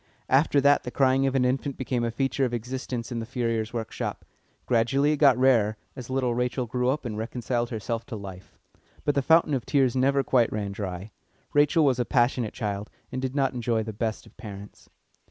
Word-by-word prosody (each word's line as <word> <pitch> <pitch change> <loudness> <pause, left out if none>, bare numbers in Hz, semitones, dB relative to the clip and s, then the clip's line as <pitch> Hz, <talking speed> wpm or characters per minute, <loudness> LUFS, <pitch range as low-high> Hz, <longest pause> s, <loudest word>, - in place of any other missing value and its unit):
After 140 +2 +4
that 145 +1 +5
the - - -6
crying 135 +1 +2
of 135 - -1
an 130 -1 +3
infant 135 +2 -1
became 125 -2 -1
a 120 - 0
feature 135 +3 -1
of 120 -2 0
existence 125 0 -5
in 120 - -2
the 115 - -4
furrier's 115 -3 -1
workshop; 115 -2 -4 0.4
gradually 135 +5 +2
it 150 - 0
got 140 -4 +5
rarer, 115 -5 +3 0.2
as 125 -3 -8
little 130 -2 0
Rachel 125 +1 -1
grew 125 +2 -1
up 135 +1 -1
and 110 -3 -4
reconciled 120 +1 -2
herself 115 0 -4
to - - -6
life. 95 -3 -10 0.5
But 145 - +2
the 140 - +1
fountain 160 +1 +4
of 130 -4 0
tears 135 -4 +2
never 135 +1 +2
quite 120 -4 +2
ran 105 -2 -3
dry. 100 0 -5 0.4
Rachel 145 +2 +4
was 130 -3 +2
a 120 - +1
passionate 120 -3 +1
child, 105 -2 -3 0.2
and 130 0 -3
did 130 0 -3
not 135 -2 +1
enjoy 120 -2 0
the 110 0 -6
best 110 +1 -3
of - - -19
parents. 100 -3 -10
125 Hz, 205 wpm, -26 LUFS, 115-135 Hz, 0.5 s, that